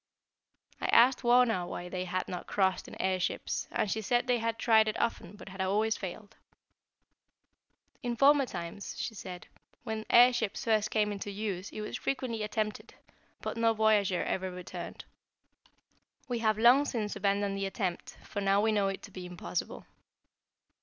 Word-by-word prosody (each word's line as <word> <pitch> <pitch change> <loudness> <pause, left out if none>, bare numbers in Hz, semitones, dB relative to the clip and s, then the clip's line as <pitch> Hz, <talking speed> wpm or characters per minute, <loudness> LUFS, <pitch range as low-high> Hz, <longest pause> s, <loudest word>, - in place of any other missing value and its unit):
I - - 0
asked 245 +2 +5
Wauna 240 -7 +3
why 175 0 -6
they 185 0 -4
had 185 +1 -2
not 180 -1 -6
crossed 190 -2 +1
in - - -11
air 190 0 +1
ships, 180 - -2
and 205 - -1
she 220 - -1
said 240 +3 +1
they 250 -2 +2
had 230 0 -1
tried 220 -2 +4
it 215 - -2
often 210 -5 -2
but 205 - -11
had 190 0 -6
always 210 +4 +1
failed. 200 +2 -8 1.7
"In 240 -2 -2
former 275 +1 +5
times," 175 +1 -6
she 230 - -3
said, 185 -3 -8 0.4
"when 220 -2 -4
air 245 +1 +7
ships 225 -4 -2
first 215 -2 +2
came 210 -1 +1
into 205 0 -5
use 200 -2 -4
it 215 - -7
was 210 - -4
frequently 250 -5 -2
attempted, 210 0 -3 0.5
but - - -4
no 230 -1 +3
voyager 210 -4 +3
ever 190 0 -2
returned. 180 0 -8 1.2
We 245 -2 -2
have 215 -2 +2
long 245 +6 +6
since 220 -7 -2
abandoned 200 0 0
the 195 0 -2
attempt, 190 -3 -4
for 205 - -5
now 195 0 +3
we 220 +1 +2
know 205 -2 +2
it 195 0 -4
to - - -10
be 180 -1 -7
impossible." 165 - -5
210 Hz, 170 wpm, -30 LUFS, 190-230 Hz, 1.7 s, air